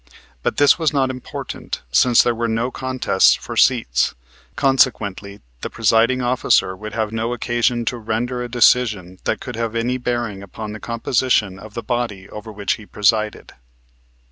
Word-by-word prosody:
But - - -1
this 145 +4 +5
was 160 -2 +2
not 135 -2 +1
important 125 - -7
since 120 - +5
there 120 - +1
were 115 0 -2
no 115 +3 -1
contests 130 -7 +2
for - - -8
seats, - - +2 0.4
consequently 115 -8 +1 0.2
the - - -4
presiding 115 +3 +2
officer 120 -6 +2
would 105 +2 -8
have 110 -2 -1
no 115 +2 -2
occasion 120 0 0
to 120 - -1
render 115 +3 -2
a 120 - -4
decision 110 -7 +2
that - - 0
could 125 - -7
have 115 0 -3
any 125 +2 -1
bearing 120 -5 -2
upon 105 +2 -7
the 110 - -7
composition 115 -4 0
of 105 +1 -12
the 115 - -4
body 110 -5 -3
over 110 +1 -9
which 100 -1 -2
he 110 - -13
presided. 110 +1 0
115 Hz, 165 wpm, -20 LUFS, 105-125 Hz, 0.4 s, this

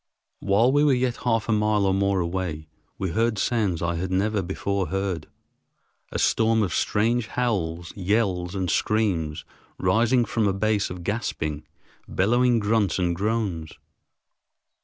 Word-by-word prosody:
While 105 +5 +3
we 145 +2 +3
were 145 -3 +4
yet 125 -1 0
half 115 -3 0
a - - 0
mile 105 -1 +2
or 95 - +2
more 100 -1 +1
away, 85 -3 -3 0.3
we 95 -3 -2
heard 115 +3 +1
sounds 100 -7 0
I 85 0 -1
had 90 +2 -3
never 100 +2 +1
before 95 +1 -2
heard—a 95 -5 -7
storm 110 0 +2
of 90 -5 -2
strange 115 +2 +1
howls, 85 -10 -2
yells, 95 -2 0
and 95 -2 -1
screams 85 -7 0 0.3
rising 120 +2 +2
from 110 -1 0
a 100 - +1
base 105 +1 0
of 90 -1 -7
gasping, 75 -7 -3 0.4
bellowing 120 +5 +2
grunts 105 -3 +1
and 90 -2 0
groans. 100 -5 -2
100 Hz, 140 wpm, -25 LUFS, 90-115 Hz, 0.4 s, were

